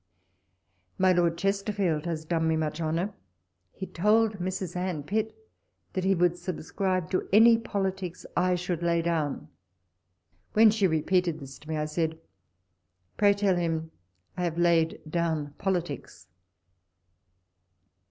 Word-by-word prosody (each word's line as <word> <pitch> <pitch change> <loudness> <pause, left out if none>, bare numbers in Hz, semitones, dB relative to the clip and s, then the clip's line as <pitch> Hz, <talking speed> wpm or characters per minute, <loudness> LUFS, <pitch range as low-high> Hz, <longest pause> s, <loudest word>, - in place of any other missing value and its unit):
My 185 0 +4
Lord 170 -1 +2
Chesterfield 195 -5 0
has 160 -2 -3
done 165 0 0
me 160 - +2
much 155 0 -2
honour: 165 +6 -1 0.6
he 190 - -6
told 210 +3 +2
Mrs. 185 -1 -3
Anne 180 -4 -2
Pitt 215 +7 -1 0.6
that 185 - -1
he 195 +1 +3
would 175 0 +2
subscribe 185 +1 -2
to 185 - -1
any 225 +3 +7
politics 190 -5 -3
I 180 0 +2
sliould 175 -1 -3
lay 170 -1 +1
down. 160 -4 -1 1.0
When 220 0 +7
she 210 -3 +2
repeated 170 +1 +1
this 135 -2 -10
to 155 - -15
me, 160 - -1
I 150 - -1
said, 160 +1 -1 0.5
" 90 +1 -47
Pray 205 -1 +5
tell 200 -2 +2
him 160 -2 -2 0.4
I 180 - -3
have 170 -1 -2
laid 170 -2 +2
down 160 -3 -1
politics." 175 -8 -3
175 Hz, 135 wpm, -28 LUFS, 160-190 Hz, 1.0 s, any